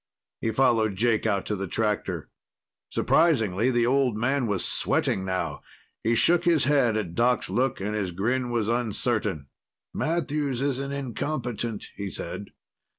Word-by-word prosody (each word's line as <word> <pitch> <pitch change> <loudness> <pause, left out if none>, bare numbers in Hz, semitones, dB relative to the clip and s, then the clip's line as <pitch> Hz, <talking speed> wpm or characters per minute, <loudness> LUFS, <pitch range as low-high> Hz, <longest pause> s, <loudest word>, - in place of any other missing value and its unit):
He 115 - -1
followed 110 -3 +2
Jake 115 +1 +1
out 100 -3 0
to 105 - -1
the 100 0 -4
tractor. 95 -5 -2 0.6
Surprisingly, 115 - +2
the 120 -2 +2
old 130 -3 +2
man 130 +2 +1
was 100 -4 -1
sweating 95 - +1
now. 85 -6 -2 0.4
He 115 +1 +2
shook 170 +8 +4
his 170 -5 +3
head 130 -6 +3
at 95 -6 -3
Doc's 120 +5 +1
look, 130 +1 0
and 105 +2 -3
his 100 -4 -2
grin 120 +8 -1
was 115 -3 0
uncertain. 110 - -1 0.5
"Matthews 150 -5 -1
is 135 -1 0
an 140 0 -4
incompetent," 120 -4 -3
he 100 -1 -4
said. 95 +3 -6
115 Hz, 150 wpm, -26 LUFS, 105-130 Hz, 0.6 s, shook